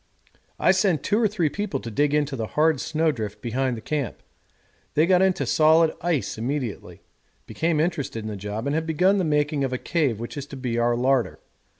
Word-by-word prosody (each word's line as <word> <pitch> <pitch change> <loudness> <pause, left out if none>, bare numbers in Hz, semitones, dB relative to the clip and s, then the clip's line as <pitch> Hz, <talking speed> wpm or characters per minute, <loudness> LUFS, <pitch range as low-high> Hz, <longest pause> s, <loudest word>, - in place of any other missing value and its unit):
I - - +4
sent 185 -5 +1
two 210 +3 +1
or 220 - +4
three 195 -6 0
people 195 -3 -3
to 115 - -7
dig 145 +6 +1
into 145 -2 0
the 115 -3 -3
hard 155 -2 +3
snow 160 0 +1
drift 105 -5 -5
behind 125 +2 -1
the - - -8
camp; 145 -4 -3 0.7
they 155 +2 +4
got 180 +1 +4
into 190 -1 +2
solid 160 +1 +4
ice 160 -9 -1
immediately, 125 -2 -4 0.4
became 160 -1 -1
interested 145 -9 -2
in - - -4
the 105 - -4
job, 105 +4 -5
and 140 - 0
have 160 +1 -1
begun 185 +5 +3
the - - +1
making 150 -2 +1
of 130 -1 -1
a - - 0
cave 140 -8 0
which 120 +5 -7
is 140 0 -5
to 140 - -9
be 120 -3 -2
our 120 0 +2
larder. 125 -4 +1
145 Hz, 210 wpm, -24 LUFS, 120-160 Hz, 0.7 s, I